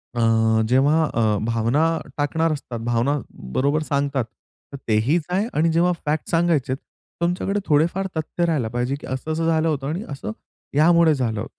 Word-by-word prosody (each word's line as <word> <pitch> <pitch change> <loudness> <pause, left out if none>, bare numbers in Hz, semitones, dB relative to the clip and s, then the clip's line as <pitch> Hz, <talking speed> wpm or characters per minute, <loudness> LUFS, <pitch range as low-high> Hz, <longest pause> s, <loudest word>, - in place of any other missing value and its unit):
अ, 115 -1 +3
जेव्हा 145 +5 +4
अ, 110 -3 +2
भावना 115 +6 +1 0.3
टाकणार 160 +3 +1
असतात, 125 -5 -6
भावना 120 +5 +1 0.4
बरोबर 140 +3 +1
सांगतात. 140 -3 -1 0.5
तर - - -5
तेहीच 115 +10 +2
आहे. 190 +4 +1
आणि 160 +2 +2
जेव्हा 170 +2 +3
फॅक्ट 150 +1 -1
सांगायचेत, 165 -6 +1 0.4
तुमच्याकडे 180 +4 0
थोडेफार 170 +6 +2
तथ्य 160 +2 -1
राहायला 155 -9 0
पाहिजे, 125 +3 0
की - - -10
असं-असं 155 +5 -2
झालं 160 0 +2
होतं 140 -4 -1
आणि 170 +7 -3
असं 135 -7 -5 0.4
यामुळे 165 +1 +5
झालं. 115 -5 -2
145 Hz, 150 wpm, -22 LUFS, 120-165 Hz, 0.5 s, यामुळे